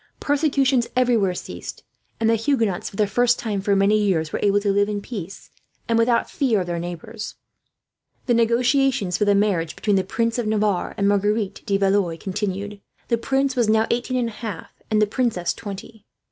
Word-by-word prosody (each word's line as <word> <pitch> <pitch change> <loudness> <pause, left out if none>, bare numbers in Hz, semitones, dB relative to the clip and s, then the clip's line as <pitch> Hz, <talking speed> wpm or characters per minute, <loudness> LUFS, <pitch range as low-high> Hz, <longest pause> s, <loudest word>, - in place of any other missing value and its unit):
Persecutions 275 -4 +2
everywhere 235 -7 +2
ceased; - - -8 0.4
and 225 - +1
the 225 - +4
Huguenots, 225 -5 0
for - - -14
the 210 - +2
first 245 +4 +2
time 210 -4 -3
for 200 0 +1
many 200 +2 +3
years, 165 -7 0
were - - -1
able 205 0 +3
to 200 -1 +1
live 205 +1 +2
in 205 -1 -2
peace, 200 -4 -8 0.4
and 230 - +1
without 235 +1 +2
fear 235 -8 +1
of - - -3
their 175 -1 -3
neighbours. 175 +6 -6 0.9
The 245 - +2
negotiations 235 -3 +2
for 210 - +2
the 205 0 +4
marriage 190 -6 +1
between 205 -2 +1
the 190 - +1
Prince 230 +4 -1
of 235 - -1
Navarre 210 -3 0
and 200 - +1
Marguerite 205 0 0
de 195 - +2
Valois 195 -4 +1
continued. 200 +2 -4 0.3
The 235 -2 +1
prince 270 +2 0
was 235 -4 +2
now 220 0 +4
eighteen 245 +2 -1
and 240 -2 0
a 220 - -12
half, 210 -8 -6 0.2
and 215 - +2
the 210 - +5
princess 210 -5 -1
twenty. 210 +1 -9
210 Hz, 190 wpm, -22 LUFS, 195-235 Hz, 0.9 s, the